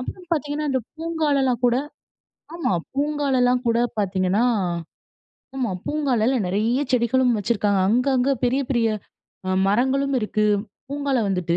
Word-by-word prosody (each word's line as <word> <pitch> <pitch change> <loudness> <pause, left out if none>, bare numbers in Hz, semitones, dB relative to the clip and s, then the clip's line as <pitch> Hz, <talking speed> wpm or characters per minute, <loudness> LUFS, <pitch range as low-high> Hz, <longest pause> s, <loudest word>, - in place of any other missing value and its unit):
அப்புறம் 360 +8 -7
பார்த்தீங்கன்னா, 300 -1 -1
அந்த 260 -1 +1 0.2
பூங்காலலாம் 295 -7 0
கூட 240 0 +3 0.8
ஆமா 340 - -1 0.2
பூங்காலலாம் 275 -4 +1
கூட 230 0 +2 0.2
பார்த்தீங்கன்னா 190 +2 +1 1.1
ஆமா. 250 -5 -1 0.2
பூங்காலெல்லாம் 260 -6 +1
நிறைய 220 +7 +1
செடிகளும் 250 +1 +3
வச்சுருக்காங்க. 205 -2 +1
அங்க, 245 +5 +2
அங்க 255 +2 +2
பெரிய, 260 +3 +1
பெரிய 235 -3 +2 0.6
அ - - -1 0.2
மரங்களும் 265 +6 +1
இருக்கு. 215 0 0 0.4
பூங்கால 280 -2 0
வந்துட்டு 180 -3 0
250 Hz, 120 wpm, -23 LUFS, 220-280 Hz, 1.1 s, கூட